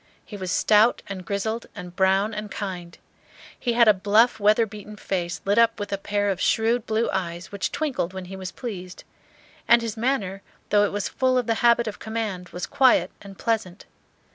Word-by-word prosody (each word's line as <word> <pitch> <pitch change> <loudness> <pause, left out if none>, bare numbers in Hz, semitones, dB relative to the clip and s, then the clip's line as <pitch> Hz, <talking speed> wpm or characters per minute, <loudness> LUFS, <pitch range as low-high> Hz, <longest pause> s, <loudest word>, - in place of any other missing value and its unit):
He 210 - -9
was 185 -2 -4
stout 215 +2 +3
and 195 -2 -6
grizzled 215 +5 -3
and 180 -3 -9
brown 195 +3 +2
and 210 0 -5
kind. 180 -5 -6 0.6
He 240 - -1
had 235 -1 +5
a 215 - +8
bluff 210 +5 +3
weather 215 +2 +4
beaten 210 0 -10
face, 180 -4 -3
lit 200 +3 +3
up 230 -1 +3
with 205 0 -4
a - - 0
pair 205 0 0
of 190 - -4
shrewd 225 +1 +1
blue 225 +1 +1
eyes 175 -2 -4
which 200 -4 -3
twinkled 270 - -2
when 190 -1 -7
he 190 +2 -8
was 185 -1 -6
pleased; 185 -7 -7 0.6
and 235 0 +5
his 225 -2 -3
manner, 220 -6 -1 0.3
though 205 0 +4
it - - -2
was 205 0 -2
full 255 -1 +1
of 250 - +1
the 230 - +1
habit 235 0 +4
of 215 - -6
command, 215 -5 -4
was 180 - -5
quiet 260 -2 +3
and 195 -1 -12
pleasant. 220 -5 -2
205 Hz, 195 wpm, -24 LUFS, 190-230 Hz, 0.6 s, a